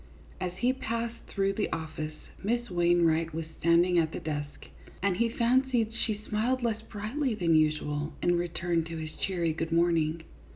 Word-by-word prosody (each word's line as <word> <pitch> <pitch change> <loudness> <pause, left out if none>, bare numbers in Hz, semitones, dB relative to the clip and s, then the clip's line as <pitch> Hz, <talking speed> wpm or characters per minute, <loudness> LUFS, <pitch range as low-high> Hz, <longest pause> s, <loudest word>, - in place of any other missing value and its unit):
As 180 -1 -2
he 250 +4 +2
passed 230 -2 -3
through 195 -1 0
the 205 +1 -1
office, 155 -1 -4 0.3
Miss 235 +2 -1
Wainwright 170 -2 +3
was 165 0 -2
standing 170 +1 +4
at 160 -1 +1
the - - -4
desk, 145 -2 -5 0.4
and 195 -3 +2
he 235 +2 +2
fancied 240 -1 +2
she 220 -2 -2
smiled 240 +4 0
less 225 -2 0
brightly 225 +4 -2
than 170 -5 +2
usual, 155 -1 +1
in 175 0 +2
return 170 -1 0
to 165 0 -6
his 160 -1 -5
cheery 170 -4 0
good 165 +1 -3
morning. 165 -1 +2
175 Hz, 165 wpm, -29 LUFS, 165-225 Hz, 0.4 s, standing